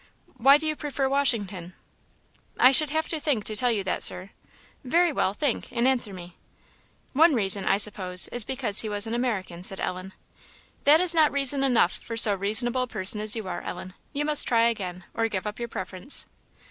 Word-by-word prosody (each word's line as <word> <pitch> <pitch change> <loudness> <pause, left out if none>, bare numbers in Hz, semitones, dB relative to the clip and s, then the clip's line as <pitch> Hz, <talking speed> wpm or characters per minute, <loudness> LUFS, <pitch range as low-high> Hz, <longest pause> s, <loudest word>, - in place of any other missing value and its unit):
"Why 275 +4 +4
do 310 - -6
you 310 0 -2
prefer 280 -2 -4
Washington?" 210 -10 -2 0.8
"I 255 - +6
should 300 +2 +6
have 315 +2 -3
to 320 - -3
think 280 -8 -2
to 215 - -1
tell 245 +3 +3
you 210 -4 -3
that, 185 - -4
Sir." 185 +2 +1 0.5
"Very 335 +5 0
well, 195 -6 -2
think, 285 -3 -4
and 240 +1 -1
answer 245 -5 0
me." 175 -2 -13 0.8
"One 315 +2 +3
reason, 200 -3 -1
I 195 - +1
suppose, 190 -3 +4
is 240 -1 0
because 235 -4 +5
he 220 - -6
was 205 0 -2
an 225 - -6
American," 210 -8 -4
said 190 +1 -3
Ellen. 185 +1 -6 0.7
"That 300 +4 +4
is 360 -2 +2
not 315 -2 +2
reason 275 0 -2
enough 245 -9 +1
for 230 - -9
so 215 -2 +4
reasonable 220 +6 -2
a 255 - -3
person 210 -2 +4
as 215 +1 +3
you 220 -4 -7
are, 175 -1 -6
Ellen; 185 - -9 0.2
you 290 +1 -4
must 300 -1 +3
try 230 -1 +1
again, 185 -5 -7
or 225 0 -2
give 195 -3 -6
up 210 +1 -7
your 235 - -5
preference." 190 +5 -3
230 Hz, 200 wpm, -24 LUFS, 195-275 Hz, 0.8 s, I